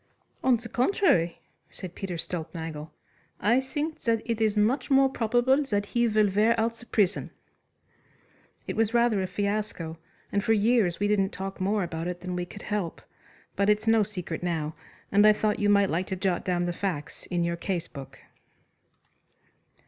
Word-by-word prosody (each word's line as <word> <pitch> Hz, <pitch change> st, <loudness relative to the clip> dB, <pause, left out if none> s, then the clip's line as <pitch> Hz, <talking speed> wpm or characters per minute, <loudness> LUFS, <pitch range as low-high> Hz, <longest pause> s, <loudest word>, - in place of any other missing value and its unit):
"On 255 Hz, -2 st, +4 dB
the 230 Hz, +1 st, -9 dB
contrary," 250 Hz, -, +2 dB, 0.3 s
said 185 Hz, -3 st, -9 dB
Peter 190 Hz, -2 st, -5 dB
Stulpnagel, 160 Hz, -2 st, -5 dB, 0.5 s
"I 235 Hz, +6 st, +3 dB
think 300 Hz, +4 st, -4 dB
that 230 Hz, -1 st, 0 dB
it 230 Hz, -2 st, -2 dB
is 215 Hz, -1 st, +2 dB
much 245 Hz, +6 st, +2 dB
more 270 Hz, -1 st, +5 dB
probable 245 Hz, +3 st, +2 dB
that 205 Hz, -5 st, -1 dB
he 235 Hz, +3 st, +1 dB
will 215 Hz, -1 st, +3 dB
wear 220 Hz, +4 st, +3 dB
out 230 Hz, +1 st, +1 dB
the 235 Hz, +1 st, -15 dB
prison." 205 Hz, -3 st, +1 dB, 1.4 s
It -, -, -4 dB
was 225 Hz, +1 st, +1 dB
rather 235 Hz, -4 st, +3 dB
a 185 Hz, -, -1 dB
fiasco 200 Hz, -6 st, -3 dB, 0.3 s
and 200 Hz, 0 st, 0 dB
for 225 Hz, -, +3 dB
years 215 Hz, -4 st, +2 dB
we 205 Hz, -, +1 dB
didn't 200 Hz, -2 st, +2 dB
talk 195 Hz, 0 st, -6 dB
more 200 Hz, +1 st, +1 dB
about 165 Hz, -1 st, -4 dB
it 180 Hz, 0 st, -5 dB
than 180 Hz, 0 st, -4 dB
we 180 Hz, 0 st, -2 dB
could 205 Hz, -, -11 dB
help, 205 Hz, -6 st, -3 dB, 0.6 s
but 200 Hz, +1 st, +2 dB
it's 210 Hz, +1 st, +2 dB
no 225 Hz, -1 st, +4 dB
secret 185 Hz, -5 st, -4 dB
now 160 Hz, -3 st, -2 dB, 0.4 s
and 205 Hz, +1 st, +6 dB
I 215 Hz, -, +8 dB
thought 210 Hz, 0 st, 0 dB
you 205 Hz, -, +2 dB
might 200 Hz, -1 st, +4 dB
like 175 Hz, +3 st, -1 dB
to 190 Hz, -, -2 dB
jot 185 Hz, -1 st, -1 dB
down 175 Hz, -2 st, 0 dB
the 175 Hz, -, -1 dB
facts 170 Hz, -6 st, -4 dB
in 175 Hz, -1 st, 0 dB
your 170 Hz, 0 st, 0 dB
case 170 Hz, -1 st, -3 dB
book. 135 Hz, -1 st, -10 dB
205 Hz, 180 wpm, -27 LUFS, 180-225 Hz, 1.4 s, I